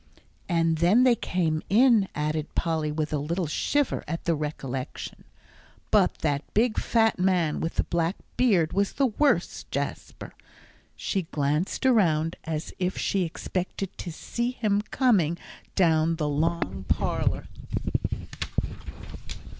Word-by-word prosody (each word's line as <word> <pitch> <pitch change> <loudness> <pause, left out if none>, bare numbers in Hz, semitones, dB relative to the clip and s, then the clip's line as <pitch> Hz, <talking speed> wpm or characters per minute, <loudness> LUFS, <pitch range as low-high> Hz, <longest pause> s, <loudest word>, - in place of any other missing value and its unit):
"And 165 -2 +2
then 190 +9 +5
they 255 -1 +6
came 165 -7 0
in," 225 -2 +5
added 155 +1 -2
Polly, 160 -2 0
with 155 0 -2
a 150 - +1
little 170 +5 -1
shiver 285 - 0
at 165 +3 -3
the 170 - +2
recollection. 140 -4 -5 0.7
"But - - +4
that 140 -1 +1
big 220 +1 +3
fat 225 -4 +2
man 180 -4 +2
with 165 - -3
the - - +2
black 170 +2 0 0.2
beard 190 -11 +3
was 200 +1 +1
the 275 - +2
worst, 275 +4 +1
Jasper." - - -4 0.6
She 190 -5 -2
glanced 150 - 0
around 165 -10 +3
as 160 -1 -4
if 185 0 -1
she 195 - 0
expected 185 +3 -4
to 175 - -5
see 235 +8 -2
him 210 -5 0
coming 195 - +3 0.4
down 165 -2 +3
the 155 -2 -1
long 155 - -1
parlour. - - 0
170 Hz, 130 wpm, -26 LUFS, 155-205 Hz, 0.7 s, they